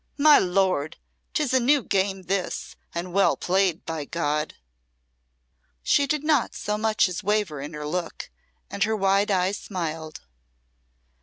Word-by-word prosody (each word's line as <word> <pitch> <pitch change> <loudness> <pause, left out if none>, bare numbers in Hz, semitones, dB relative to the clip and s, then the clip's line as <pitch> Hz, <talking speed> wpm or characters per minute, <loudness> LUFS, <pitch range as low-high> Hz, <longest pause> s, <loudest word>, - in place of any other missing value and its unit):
"'My 300 +1 +7
lord!' 180 -5 0 0.4
'Tis 295 -5 0
a 260 - +5
new 270 +2 +3
game 195 -1 0
this, 190 0 -3 0.2
and 175 +1 -5
well 195 +1 +3
played, 185 -2 +1
by 160 -2 -3
God!" 150 0 -2 1.3
She 280 - +3
did 300 +1 -1
not 305 -5 +1
so 210 - -2
much 215 -1 +2
as 180 +1 -4
waver 205 -8 0
in 145 +3 -7
her 150 0 -6
look, 170 +2 -4 0.4
and 200 - 0
her 220 +1 +1
wide 195 0 +2
eyes 190 +1 +1
smiled. 160 -4 -5
190 Hz, 145 wpm, -25 LUFS, 170-215 Hz, 1.3 s, My